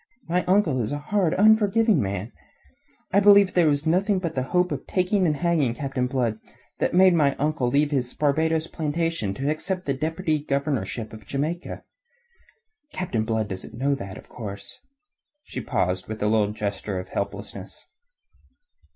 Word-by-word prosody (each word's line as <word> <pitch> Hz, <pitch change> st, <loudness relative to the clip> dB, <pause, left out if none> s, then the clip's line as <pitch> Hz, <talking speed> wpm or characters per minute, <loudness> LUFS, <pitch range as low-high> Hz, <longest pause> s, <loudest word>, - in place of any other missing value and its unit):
My 180 Hz, +2 st, +1 dB
uncle 180 Hz, -9 st, +2 dB
is 110 Hz, -, -2 dB
a 145 Hz, -, -1 dB
hard, 175 Hz, +3 st, 0 dB
unforgiving 220 Hz, +1 st, +4 dB
man. 100 Hz, +2 st, -3 dB, 0.8 s
I 200 Hz, -, +6 dB
believe 200 Hz, -1 st, +6 dB
that 175 Hz, -3 st, +4 dB
it -, -, +5 dB
was 145 Hz, +1 st, 0 dB
nothing 190 Hz, +5 st, +2 dB
but 175 Hz, -3 st, -3 dB
the 130 Hz, -, -1 dB
hope 180 Hz, 0 st, +2 dB
of -, -, -4 dB
taking 185 Hz, 0 st, +1 dB
and 150 Hz, -, +1 dB
hanging 155 Hz, -7 st, +1 dB
Captain 135 Hz, -2 st, -2 dB
Blood 120 Hz, -4 st, -1 dB, 0.4 s
that -, -, 0 dB
made 185 Hz, 0 st, +6 dB
my 145 Hz, -4 st, +3 dB
uncle 150 Hz, -3 st, 0 dB
leave 145 Hz, +4 st, +2 dB
his 125 Hz, -3 st, 0 dB
Barbados 160 Hz, +2 st, +1 dB
plantations 160 Hz, -, -2 dB
to 135 Hz, -, -2 dB
accept 180 Hz, +5 st, -2 dB
the 140 Hz, -, 0 dB
deputy 155 Hz, +2 st, -1 dB
governorship 140 Hz, -7 st, -2 dB
of 110 Hz, -2 st, -12 dB
Jamaica. 155 Hz, +6 st, -3 dB, 1.1 s
Captain 120 Hz, -12 st, -2 dB
Blood 110 Hz, -1 st, -1 dB
doesn't 95 Hz, +3 st, -7 dB
know 140 Hz, +3 st, +1 dB
that, 95 Hz, -8 st, -6 dB
of -, -, -13 dB
course...." 100 Hz, -4 st, -7 dB, 0.6 s
She -, -, -6 dB
paused 90 Hz, +1 st, -1 dB
with 110 Hz, -1 st, -5 dB
a -, -, +2 dB
little 105 Hz, -1 st, +2 dB
gesture 105 Hz, -2 st, -3 dB
of 95 Hz, 0 st, -8 dB
helplessness. 100 Hz, +2 st, -6 dB
145 Hz, 165 wpm, -24 LUFS, 110-175 Hz, 1.1 s, I